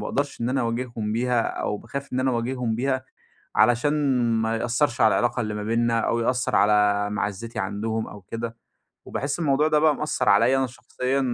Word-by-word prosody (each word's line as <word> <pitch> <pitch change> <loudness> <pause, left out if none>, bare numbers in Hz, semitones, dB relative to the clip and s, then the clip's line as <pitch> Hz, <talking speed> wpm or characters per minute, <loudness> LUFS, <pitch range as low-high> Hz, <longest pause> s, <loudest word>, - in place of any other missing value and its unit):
باقدرش 140 -1 -2
إن 115 - 0
أنا 130 - 0
أواجههم 115 -2 -2
بيها 120 +1 +1
أو 105 - -2
باخاف 140 +6 -7
إن 130 - 0
أنا 130 0 +2
أواجههم 120 -1 -1
بيها، 130 +2 -1 0.5
علشان 120 +6 +4 0.5
ما 110 0 0
يأثّرش 120 +2 0
على 110 - +7
العلاقة 120 +1 +1
اللي 105 -3 -2
ما 105 - -4
بيننا 115 +1 +1
أو 115 - 0
يأثّر 125 +1 0
على 105 0 +3
مَعزِّتي 105 +2 -4
عندهم 110 +3 -2
أو 105 - -10
كده. 115 +4 -6 0.5
وباحس 140 +3 -3
الموضوع 150 -1 +2
ده 155 -1 +3
بقى 155 -1 +4
مأثّر 150 +2 -1
عليّا 115 +6 +5
أنا 130 - +1
شخصيًا 130 +2 -3
120 Hz, 180 wpm, -24 LUFS, 110-130 Hz, 0.5 s, على